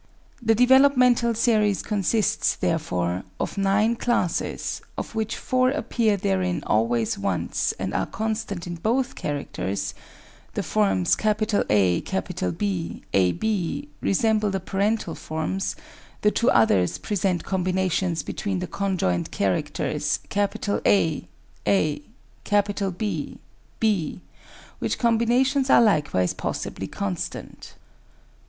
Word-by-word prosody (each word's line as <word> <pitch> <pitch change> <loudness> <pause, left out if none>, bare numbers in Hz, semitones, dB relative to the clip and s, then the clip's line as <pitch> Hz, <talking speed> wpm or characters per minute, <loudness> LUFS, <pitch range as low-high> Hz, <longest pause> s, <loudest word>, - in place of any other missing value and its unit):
The 225 -1 +3
developmental 250 -1 +5
series 215 -3 +2
consists, 210 0 +1
therefore, 90 - -1 0.2
of - - -3
nine 200 +4 +2
classes, 235 -8 -1 0.2
of - - -5
which 220 -1 -2
four 255 0 +2
appear 230 -6 +1
therein 185 -4 0
always 115 0 +1
once 100 -2 -1
and - - -3
are - - 0
constant 220 -5 -3
in 175 -1 -5
both 245 +8 0
characters; 100 -9 -3 0.6
the - - -1
forms 95 -4 +2
AB, 100 - 0
ab, 165 - 0
resemble 215 +1 +2
the 195 0 -1
parental 200 -1 -1
forms, 160 +6 -3 0.5
the 210 - +5
two 235 - +2
other 100 -5 +4 0.2
present 190 -5 0
combinations 185 -2 0
between 200 -3 -3
the 180 - -2
conjoined 180 - -1
characters 145 +7 -1 0.2
A, 200 -5 +1 0.4
a, 105 +10 +2 1.0
B, 210 0 -3 0.4
b, 200 -8 0 0.6
which - - -1
combinations 245 +4 +2
are - - +7
likewise 150 - +2
possibly - - -4
constant. 95 -3 -5
190 Hz, 100 wpm, -24 LUFS, 145-220 Hz, 1.0 s, are